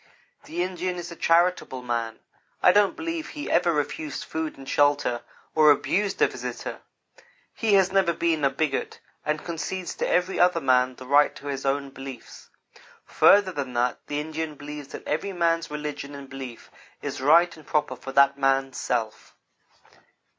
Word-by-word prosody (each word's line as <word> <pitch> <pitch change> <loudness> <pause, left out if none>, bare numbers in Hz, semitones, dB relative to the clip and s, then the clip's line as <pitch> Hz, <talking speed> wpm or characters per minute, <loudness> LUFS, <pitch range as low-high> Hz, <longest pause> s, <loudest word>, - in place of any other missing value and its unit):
The 175 +2 -2
Indian 180 0 -3
is 175 0 -6
a - - -7
charitable 165 -7 +2
man. 115 -2 -3 0.4
I - - +8
don't 205 0 +3
believe 330 -1 -4
he 295 -1 -6
ever 170 - +3
refused 150 0 -3
food 160 -1 -4
and 135 -1 -11
shelter 145 -5 +2 0.3
or 155 -1 +6
abused 195 +7 +2
a - - +6
visitor. - - -6 0.7
He 220 -3 +2
has 190 -1 +4
never 190 -3 +3
been 165 -2 0
a 140 - +5
bigot, 135 0 -2 0.2
and 150 0 -2
concedes 170 +2 -4
to - - -1
every 180 +2 +1
other 180 -1 +4
man 130 -3 +2
the 130 - -11
right 145 +3 +4
to - - -12
his 135 -1 -3
own 140 0 -1
beliefs. 135 -2 -10 0.6
Further 200 -2 +5
than 140 -6 -4
that, 120 +1 0
the 145 - -2
Indian 155 0 -4
believes 145 0 -8
that - - -10
every 175 +6 -2
man's 165 -1 +1
religion 150 -1 -5
and 140 -1 -9
belief 135 -3 -9 0.3
is - - -4
right 170 +5 +5
and 155 -2 -16
proper 150 -4 0
for 135 +2 -8
that 140 +1 +4
man's 135 -1 +1
self. 115 -3 -3
150 Hz, 170 wpm, -25 LUFS, 135-175 Hz, 0.7 s, I